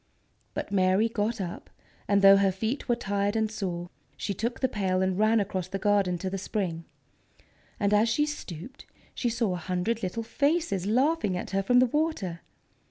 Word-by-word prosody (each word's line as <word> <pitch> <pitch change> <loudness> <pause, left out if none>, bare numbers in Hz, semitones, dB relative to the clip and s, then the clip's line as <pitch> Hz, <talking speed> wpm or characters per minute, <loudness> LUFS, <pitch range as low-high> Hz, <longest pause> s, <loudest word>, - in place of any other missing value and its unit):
But - - -4
Mary 190 +2 +3
got 225 +1 -2
up, 175 -3 -6 0.4
and, 200 0 +3
though 195 0 +9
her 195 -1 +3
feet 220 +9 -3
were 240 - +4
tired 200 -2 -1
and 220 -1 0
sore, 175 -5 -4 0.3
she 200 - -2
took 230 +5 -3
the 260 - +2
pail 190 -5 0
and 190 -1 0
ran 215 -1 +3
through 190 -1 -3
the 195 - -2
garden 195 -2 +2
to 185 +2 -3
the 195 - -3
spring. 180 -5 -3 0.9
And 205 0 +2
as 215 +2 +4
she 295 +6 +2
stooped 260 - -8 0.3
she 245 - -1
saw 230 -4 0
a - - -2
hundred 185 +6 -2
little 195 +5 -3
faces 285 - 0
laughing 255 - +2
at - - -5
her 195 0 +1
from 245 +5 +3
the 250 - +6
water. 250 - -1
205 Hz, 185 wpm, -28 LUFS, 185-230 Hz, 0.9 s, though